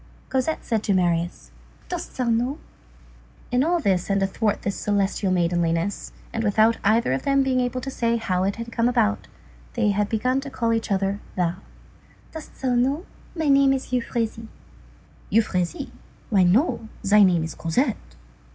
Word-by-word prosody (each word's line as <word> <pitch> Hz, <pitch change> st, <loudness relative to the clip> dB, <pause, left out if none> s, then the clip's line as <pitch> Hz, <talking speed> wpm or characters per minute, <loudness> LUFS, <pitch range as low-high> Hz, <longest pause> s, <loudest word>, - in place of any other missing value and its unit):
Cosette 265 Hz, +4 st, -1 dB
said 225 Hz, -2 st, 0 dB
to 200 Hz, -2 st, +1 dB
Marius:— 175 Hz, -1 st, -1 dB, 0.4 s
"Dost 355 Hz, -1 st, -6 dB
thou 255 Hz, -, 0 dB
know?—" 240 Hz, +4 st, 0 dB, 0.9 s
[In 250 Hz, +1 st, +3 dB
all 345 Hz, +3 st, +2 dB
this 190 Hz, -, 0 dB
and 195 Hz, 0 st, +2 dB
athwart 205 Hz, +2 st, -1 dB
this 200 Hz, -1 st, -2 dB
celestial 200 Hz, 0 st, 0 dB
maidenliness, 170 Hz, +1 st, 0 dB, 0.2 s
and 225 Hz, -, -1 dB
without 220 Hz, +2 st, +3 dB
either 220 Hz, -, +3 dB
of 135 Hz, -, -1 dB
them 275 Hz, -1 st, +2 dB
being 260 Hz, -1 st, +1 dB
able 250 Hz, 0 st, -1 dB
to 270 Hz, -, -5 dB
say 235 Hz, -2 st, 0 dB
how 185 Hz, -5 st, -1 dB
it 195 Hz, +1 st, 0 dB
had 230 Hz, 0 st, -7 dB
come 230 Hz, +1 st, +1 dB
about, 230 Hz, -3 st, +1 dB, 0.5 s
they 220 Hz, -4 st, +2 dB
had 205 Hz, +1 st, 0 dB
begun 255 Hz, +4 st, 0 dB
to 280 Hz, -, -7 dB
call 230 Hz, -4 st, 0 dB
each 225 Hz, 0 st, -2 dB
other 195 Hz, +1 st, 0 dB, 0.2 s
thou.] 175 Hz, -1 st, 0 dB, 0.7 s
"Dost 320 Hz, -1 st, -10 dB
thou 255 Hz, -1 st, +2 dB
know? 270 Hz, +8 st, +1 dB, 0.3 s
My 320 Hz, -2 st, -1 dB
name 275 Hz, -1 st, +5 dB
is 265 Hz, -1 st, -4 dB
Euphrasie." 230 Hz, -2 st, -2 dB, 0.8 s
"Euphrasie? 185 Hz, -5 st, 0 dB, 0.4 s
Why, 200 Hz, -3 st, +4 dB
no, 220 Hz, -, +2 dB
thy 210 Hz, +1 st, +5 dB
name 180 Hz, -4 st, +4 dB
is 160 Hz, -1 st, -5 dB
Cosette." 170 Hz, -, -2 dB
225 Hz, 165 wpm, -24 LUFS, 195-255 Hz, 0.9 s, name